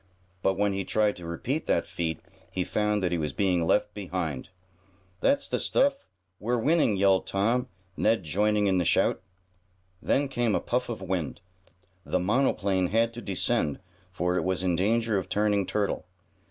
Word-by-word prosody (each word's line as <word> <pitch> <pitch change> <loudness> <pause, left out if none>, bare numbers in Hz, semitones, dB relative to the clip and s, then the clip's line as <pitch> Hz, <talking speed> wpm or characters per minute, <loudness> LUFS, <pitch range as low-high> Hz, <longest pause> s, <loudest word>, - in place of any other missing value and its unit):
But 95 +1 +2
when 100 0 +2
he 95 0 -2
tried 105 +1 +1
to 85 -1 -8
repeat 125 - -3
that - - +2
feat 80 -2 -3 0.3
he 90 - -2
found 105 +1 0
that 90 - +1
he 85 - 0
was 75 -3 -2
being 90 -4 +1
left 105 +4 +2
behind. 90 -8 -4 0.7
"That's 280 0 +2
the - - -1
stuff! 280 0 +1 0.3
We're 120 +4 0
winning!" 140 -4 +2
yelled 95 -1 +3
Tom, 115 +6 +1 0.3
Ned 110 -3 +2
joining 105 +6 +1
in 95 -2 +2
the - - +2
shout. - - +2 0.8
Then 140 +1 +1
came 120 -5 0
a - - +2
puff 125 +1 -1
of 110 -5 -5
wind. 90 -6 -2 0.6
The - - 0
monoplane 95 -2 +1
had 115 +4 +1
to 120 - -7
descend, 90 -7 0 0.3
for 90 0 0
it - - 0
was 95 -1 -1
in 90 -2 +2
danger 110 +3 +1
of 95 - -7
turning 105 -2 +1
turtle. 105 -3 -1
100 Hz, 170 wpm, -27 LUFS, 90-115 Hz, 0.8 s, yelled